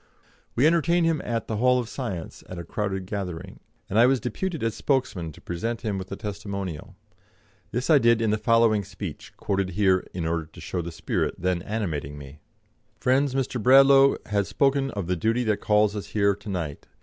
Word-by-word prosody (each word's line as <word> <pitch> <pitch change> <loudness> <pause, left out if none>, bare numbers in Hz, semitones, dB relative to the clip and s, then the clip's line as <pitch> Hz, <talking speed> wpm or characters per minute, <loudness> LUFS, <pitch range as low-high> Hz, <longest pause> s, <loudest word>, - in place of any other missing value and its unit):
We 130 - +3
entertained 170 +1 +3
him 165 -2 +1
at 115 -1 -2
the 110 - -2
Hall 125 +3 +4
of 120 -2 -2
Science 110 - -6
at 90 - -7
a 85 - -5
crowded 95 +1 -3
gathering, 90 -4 -5 0.3
and 105 - +1
I 120 - +7
was 135 0 +3
deputed 160 - -3
as 115 -1 0
spokesman 125 - -1
to - - -16
present 115 +7 -3
him 105 -4 -2
with 95 0 -8
a - - -2
testimonial. 100 -5 -6 0.7
This 125 +3 -2
I 155 -3 +6
did 115 -2 +4
in 115 -2 +1
the 110 - 0
following 115 -1 +3
speech, - - -8
quoted 95 -1 -1
here 95 -3 +3
in 90 -3 -4
order 80 -1 -1
to - - -15
show 90 - -3
the 85 0 -6
spirit 80 - -2
then 90 -1 -1
animating 80 -10 -3
me: 70 +1 -11 0.6
"Friends, 130 +1 +2
Mr. 130 -3 -1
Bradlaugh 135 +3 +7
has 100 -2 0
spoken 135 - +1
of 100 -7 -4
the 90 +1 0
duty 115 +8 +1
that 110 -3 0
calls 105 0 +3
us 105 - -5
here 100 -1 +2
to 100 +1 -10
night. 85 -7 -4
105 Hz, 195 wpm, -25 LUFS, 95-125 Hz, 0.7 s, I